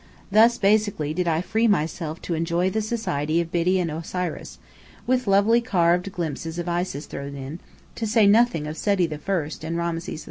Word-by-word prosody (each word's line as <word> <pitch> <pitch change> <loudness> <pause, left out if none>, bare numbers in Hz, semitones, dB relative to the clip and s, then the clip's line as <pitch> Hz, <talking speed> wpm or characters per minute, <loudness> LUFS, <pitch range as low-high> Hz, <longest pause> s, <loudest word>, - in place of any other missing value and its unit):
Thus 230 +3 +5
basely 200 -7 +1
did 180 +1 -1
I 165 0 +1
free 220 +5 +1
myself 160 -4 -1
to 175 - -3
enjoy 170 +3 0
the 220 - 0
society 170 -9 -1
of 170 -1 -3
Biddy 180 +2 +2
and 170 -3 -1
Osiris, 165 +2 -5 0.5
with 255 -2 +1
lovely 205 +4 +4
carved 180 -3 +1
glimpses 165 -2 -4
of 175 0 -4
Isis 175 -4 -2
thrown 140 0 -7
in, 140 +4 -7 0.4
to 225 - -2
say 220 0 +4
nothing 205 -6 +4
of 155 +1 -6
Seti 200 -4 +1
I 155 +1 -2
and 165 +2 -3
Rameses 170 0 -3
II. - - -5
175 Hz, 180 wpm, -24 LUFS, 160-205 Hz, 0.5 s, Thus